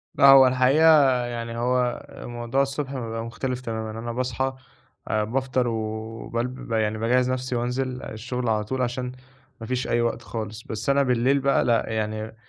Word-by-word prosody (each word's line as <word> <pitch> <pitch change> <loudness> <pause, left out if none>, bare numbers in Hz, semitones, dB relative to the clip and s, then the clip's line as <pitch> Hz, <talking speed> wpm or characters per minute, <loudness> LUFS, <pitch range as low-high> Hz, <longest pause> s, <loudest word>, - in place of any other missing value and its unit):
لأ، - - +5
هو 135 -1 +9
الحقيقة 130 0 +5
يعني 115 -1 -5
هو 125 0 0
الموضوع 120 +3 -2
الصبح 140 0 -2
بيبقى 115 -2 -4
مختلف 125 +2 -4
تمامًا، 110 -2 -4
أنا 120 0 -4
باصحى 130 +2 -1 0.5
آآ، 110 0 +1
بافطر 130 +2 0
وبالب 115 +2 -3
ب - - -8
يعني 110 -1 +1
باجهّز 125 +3 +2
نَفْسي 130 -1 -2
وأنزل 125 +1 -2
الشُغل 125 +2 -4
على 110 -1 +1
طول 130 +5 -3
عشان 125 +1 -2 0.5
ما 115 - -6
فيش 130 +1 -2
أي 120 - +1
وقت 115 0 -1
خالص، 110 -1 -6
بس 110 +4 -4
أنا 140 0 +4
بالليل 130 +2 +2
بقى 140 0 +2
لأ، 115 -2 +2
يعني 110 0 -3
120 Hz, 170 wpm, -24 LUFS, 115-130 Hz, 0.5 s, هو